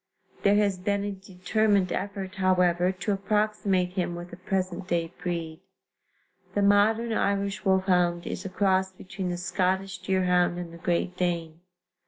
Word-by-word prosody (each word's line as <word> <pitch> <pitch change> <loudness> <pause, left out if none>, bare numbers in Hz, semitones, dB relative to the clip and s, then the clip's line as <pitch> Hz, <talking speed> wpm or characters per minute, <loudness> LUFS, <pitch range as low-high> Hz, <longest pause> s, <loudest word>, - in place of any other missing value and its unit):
There 200 0 +4
has 200 -3 +2
been 200 +2 0
a 205 - -2
determined 195 +1 0
effort, 195 -1 -4
however, 180 -2 +2
to 190 +2 -3
approximate 200 -2 +1
him 180 -2 -2
with 175 +1 -8
a - - -4
present 185 0 -3
day 170 -1 -1
breed. 165 -2 -3 1.0
The 205 - +2
modern 220 +3 +3
Irish 200 -1 0
wolfhound 180 -2 +2
is - - -4
a 195 - -5
cross 190 -1 +1
between 190 0 -6
the 175 - -2
Scottish 185 +1 -1
deerhound 180 -2 +2
and 175 -1 -6
the 170 - -11
Great 175 +1 -1
Dane. 170 -3 -2
185 Hz, 150 wpm, -27 LUFS, 180-200 Hz, 1.0 s, There